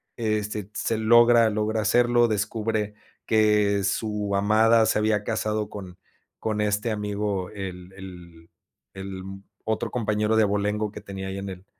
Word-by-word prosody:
Este 105 -2 -2
se 115 - -1
logra 120 +1 +5
logra 110 +1 -1
hacerlo 120 +2 +3
descubre 105 0 -2 0.3
que 105 -2 +3
su 105 0 -1
amada 110 +3 +4
se 110 - +1
había 105 -1 +1
casado 110 -1 -2
con 95 -3 -9 0.4
con 110 -1 -2
este 105 +2 0
amigo 105 -2 -2
el 95 -3 -7
el 85 -3 -12 0.4
el 95 -1 -7 0.4
otro 110 0 -2
compañero 105 -2 0
de 110 - +5
abolengo 105 +1 -1
que 105 - -9
tenía 95 -2 -7
ahí 95 0 -5
en 100 0 -5
el 95 0 -9
105 Hz, 140 wpm, -25 LUFS, 100-110 Hz, 0.4 s, logra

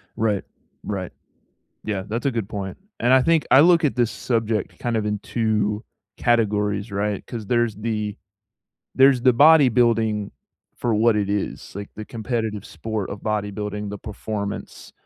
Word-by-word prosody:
Right. 105 -3 0 0.4
Right. 95 -3 -4 0.7
Yeah, 100 -3 -2
that's 115 +5 -3
a 140 - +2
good 115 -4 -3
point. 95 -2 -5 0.2
And 120 +2 +3
I 130 - +6
think 165 +2 +2
I 130 - +8
look 170 +2 +6
at 145 - 0
this 120 -2 +1
subject 115 -3 -2
kind 120 -2 -1
of 110 - -1
in 105 -1 -1
2 105 -1 -1 0.3
categories, 105 -3 +1
right, 100 0 -2
'cause 115 -3 -6
there's 120 -2 +1
the 105 0 -3 0.8
there's 135 -2 +5
the 130 -1 +6
bodybuilding 120 -7 +4 0.5
for 120 - -1
what 115 +2 +4
it 105 -2 0
is, 100 -2 -3
like, 100 0 -6
the 110 - -7
competitive 110 -2 -3
sport 110 -3 -4
of 100 - -7
bodybuilding, 105 -1 -3
the 105 0 -6
performance. 105 0 -6
110 Hz, 155 wpm, -23 LUFS, 105-120 Hz, 0.8 s, I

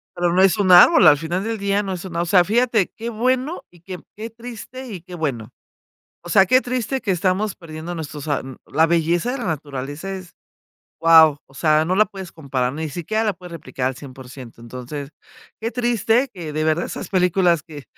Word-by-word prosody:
Pero 175 -1 0
no 185 - +4
es 195 +2 +4
un 195 -3 +2
árbol, 180 - +8
al 145 - +7
final 170 +5 -3
del 225 +1 -3
día, 200 0 0
no 195 -1 -3
es 180 0 -7
una 170 -2 -3
o - - -1
sea, 180 +1 +5
fíjate, 225 0 +1
qué 230 +1 -5
bueno 255 +7 -1
y 175 -2 -21
qué 180 0 -8 0.2
qué 220 +2 -6
triste 240 +3 -9
y 195 -7 -7
qué 180 +1 -11
bueno. 135 -10 -3 0.7
O 175 - -9
sea, 195 +2 +5
qué 255 +6 +4
triste 255 +1 -2
que 200 - -1
estamos 190 +3 0
perdiendo 165 +1 -8
nuestros 150 -2 -7
ar 145 - -1
mm, 130 -1 -10
la 160 +3 +3
belleza 170 +6 +1
de 270 - -3
la 240 - -5
naturaleza 145 +2 -5
es, 185 -2 -9 0.7
¡guau!, 160 -3 +6
o 135 - -21
sea, 155 +2 +2
no 185 - 0
la 215 - +6
puedes 190 -3 -9
comparar, 130 -5 -2
ni 160 0 -4
siquiera 215 +8 -2
la 210 - +1
puedes 180 0 -12
replicar 140 -5 -5
al 130 - -6
100%. 130 -3 -11
Entonces, 130 +4 -8 0.5
qué 225 - -2
triste 240 +1 +1
que 170 -6 -7
de 155 +1 -1
verdad 160 +2 +1
esas - - -7
películas 180 -3 +2
que, 150 -4 -11
175 Hz, 210 wpm, -21 LUFS, 155-210 Hz, 0.7 s, árbol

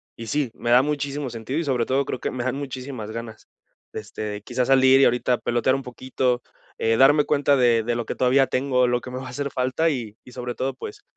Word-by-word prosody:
y 115 - -8
sí, 140 0 -1
me 120 - -5
da 125 +1 +7
muchísimo 145 -1 -2
sentido 115 +4 -5
y - - -1
sobre 130 -6 0
todo 135 +2 +1
creo 130 - -4
que - - -2
me 125 -1 -4
dan 130 +1 -1
muchísimas 130 -5 -6
ganas, 115 -1 -8 0.5
este, 105 0 -6
quizás 125 +2 -1
salir 130 0 +6
y - - +7
ahorita 125 0 +2
pelotear 120 +2 +1
un 135 - -3
poquito, 125 0 -2 0.4
eh, 115 0 +1
darme 145 +3 +6
cuenta 145 -1 +2
de 120 -3 +3
de 120 +1 -1
lo 120 -1 -3
que - - -4
todavía 130 +1 +3
tengo, 130 -1 +1
lo 120 0 +1
que 125 - -9
me 125 - -5
va 130 0 -6
a - - -7
hacer 140 +3 -3
falta 130 +5 0
y 115 -7 -4
y 125 - -14
sobre 125 -1 -5
todo, 135 +1 -2
pues, 130 - -9
125 Hz, 235 wpm, -23 LUFS, 120-135 Hz, 0.5 s, da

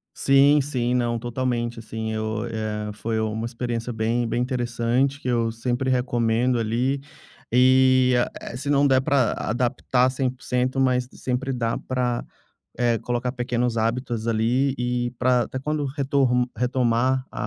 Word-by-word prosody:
Sim, 140 +2 +5
sim. 125 -3 -1
Não, 120 -1 0
totalmente, 120 -1 -2
assim, 110 0 -5
eu 110 +1 -2
é, 105 -2 -3
foi 110 +1 -3
uma 110 +1 -2
experiência 120 0 -3
bem 115 +2 0
bem 120 - -1
interessante, 125 +2 0
que 125 - -5
eu 115 -2 +1
sempre 120 +3 -2
recomendo, 120 -1 +1
ali, 120 +5 0 0.5
e, 130 0 +5 0.3
eh, - - -7
se 140 +3 -5
não 140 0 +4
der 130 -1 +4
para 130 -3 +2
adaptar 125 +2 0
100%, 130 0 -1
mas 125 -1 +2
sempre 130 +1 -2
dá 115 -2 -1
para, 125 -2 -2 0.5
eh, 120 -2 +2
colocar 120 +2 -2
pequenos 120 -2 -1
hábitos, 115 0 -1
ali, 120 +5 +1
e 125 0 -1
para 125 -1 +3
até 130 - -5
quando 150 +2 -2
retorm 135 -3 +1
retomar 125 +1 +1
a - - -4
125 Hz, 145 wpm, -24 LUFS, 115-130 Hz, 0.5 s, Sim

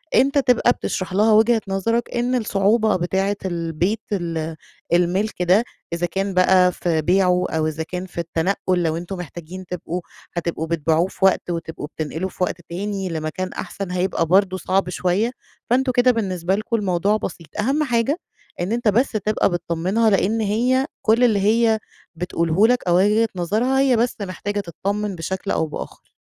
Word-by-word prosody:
أنتَ 275 +2 +4
تبقى 250 -3 +4
بتشرح 185 -6 -3
لها 215 +3 +4
وجهة 225 +1 +4
نظرك 230 +5 -1
إن 245 +1 +1
الصعوبة 215 -1 +2
بتاعة 190 +3 0
البيت 175 +4 -1
ال 165 -4 -2 0.4
المِلْك 180 +4 +1
ده 185 +6 +4 0.3
إذا 170 +1 0
كان 195 +3 -2
بقى 185 0 +5
في 170 -2 -1
بيعه 180 +2 +3
أو 160 -1 0
إذا 155 +1 -3
كان 180 +3 -5
في 185 - -16
التنقل 180 +2 0
لو 160 -1 0
أنتم 175 +3 -6
محتاجين 175 +2 -8
تبقوا 180 0 -4 0.4
هتبقوا 165 -1 -2
بتبيعوه 165 +1 +1
في 190 - -1
وقت 190 -1 +2
وتبقوا 165 -3 -4
بتنقلوا 160 +4 -3
في 185 - -4
وقت 175 -1 -2
تاني 195 +2 -3
لمكان 160 +3 -4
أحسن 195 -2 -5
هيبقى 180 -2 0
برضو 185 +2 +3
صعب 185 0 0
شويّة، 185 +6 0 0.4
فأنتم 255 +2 +2
كده 250 +1 +4
بالنسبة 190 -5 -1
لكم 215 +3 -2
الموضوع 200 0 +1
بسيط. 170 -5 -6
أهم 270 +8 +1
حاجة؛ 240 +1 +1 0.4
إن 175 +4 -2
أنتَ 235 -1 0
بس 235 +6 +3
تبقى 215 -1 +1
بتطمنها 175 +6 0
لأن 210 +2 +2
هيّ 245 +6 +2 0.2
كل 230 +3 +3
اللي 220 -4 +4
هيّ 220 +2 +3 0.4
بتقوله 170 +3 +2
لك 250 +1 +2
أو 175 - +4
وجهة 210 +4 +3
نظرها 215 +10 +1
هيّ 270 -2 +4
بس 240 +2 +1
محتاجة 205 +1 -3
تطمن 200 +3 -3
بشكل 190 +4 -4
أو 160 - +1
بآخر. 150 - -8
190 Hz, 165 wpm, -21 LUFS, 175-220 Hz, 0.4 s, بقى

